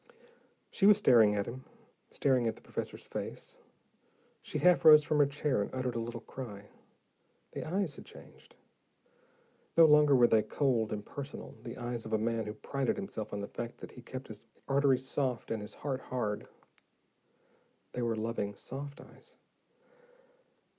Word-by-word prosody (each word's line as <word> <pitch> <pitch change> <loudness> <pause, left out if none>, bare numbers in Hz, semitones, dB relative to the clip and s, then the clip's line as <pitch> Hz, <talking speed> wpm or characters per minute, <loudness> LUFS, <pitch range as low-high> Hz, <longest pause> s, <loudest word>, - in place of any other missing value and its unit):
She 195 - +3
was 210 -1 +8
staring 115 - +5
at 100 -1 0
him, 130 +4 -7 0.5
staring 130 -4 +1
at 110 - -1
the - - -17
professor's - - -6
face. - - -7 0.8
She - - -4
half 180 -1 +4
rose 155 -1 +9
from 150 +1 +1
her 145 - +6
chair, 140 -4 0
and 100 - -2
uttered 130 -1 -1
a 115 - -2
little 115 0 -5
cry. 105 -6 -9 0.8
The - - -5
eyes 180 -1 -2
had - - -9
changed, - - -14 1.2
no 165 - +9
longer 150 -2 +6
were 125 -2 +6
they 110 -2 +4
cold, 120 -4 0
impersonal, 135 +7 -6
the 115 +1 -8
eyes 120 -1 -4
of 110 - -6
a - - +4
man 115 0 -1
who 105 - -5
prided 140 -2 -2
himself 195 - -5
on 100 - -4
the 100 - -4
fact 120 0 -6
that - - -10
he 125 - -12
kept 130 +2 -8
his - - -11 0.2
arteries 135 -2 +2
soft 130 -4 -2
and 110 -2 -2
his 105 - -8
heart 135 -2 -3
hard; 105 -5 -3 1.4
they 125 - -4
were 115 -1 0
loving, 110 -2 -3
soft 140 +6 -8
eyes. - - -16
125 Hz, 165 wpm, -32 LUFS, 110-140 Hz, 1.4 s, rose